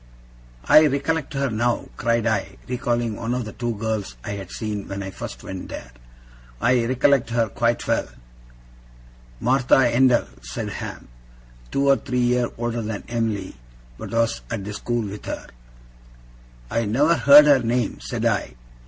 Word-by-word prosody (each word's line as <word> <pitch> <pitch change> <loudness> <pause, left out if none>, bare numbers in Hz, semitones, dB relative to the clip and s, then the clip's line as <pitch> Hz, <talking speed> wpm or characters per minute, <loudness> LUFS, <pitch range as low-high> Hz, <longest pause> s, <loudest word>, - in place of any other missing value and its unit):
'I 155 0 +8
recollect 145 +2 -1
her 135 -2 0
now!' 120 +2 0
cried 115 +1 0
I, 110 -2 -1
recalling 120 -2 -1
one 115 +3 -2
of 125 -2 -2
the 110 - -8
two 120 -1 -3
girls 105 - -3
I - - -5
had 100 -2 -6
seen 105 -1 -4
when 100 0 -5
I 95 - -6
first - - -8
went 95 -1 -7
there. - - -8 0.7
'I 125 -1 +3
recollect 130 +1 +2
her 115 -1 +1
quite 115 +3 0
well!' - - +1 1.3
'Martha 130 +1 +3 0.2
Endell,' 125 -1 +4 0.2
said - - -5
Ham. - - -7 0.6
'Two 140 0 0
or 135 0 +6
three 125 -2 -4
year 125 0 +2
older 120 0 -2
than 110 -2 -4
Em'ly, 110 -5 -2 0.5
but - - -6
was 115 0 0
at 110 -4 -4
the 105 - -5
school 120 0 -2
with 100 +1 -8
her.' - - -5 1.2
'I 115 0 0
never 140 +10 +3
heard 145 -1 +8
her 145 -2 +6
name,' 120 -1 -1
said - - -4
I. - - 0
120 Hz, 160 wpm, -23 LUFS, 110-125 Hz, 1.3 s, I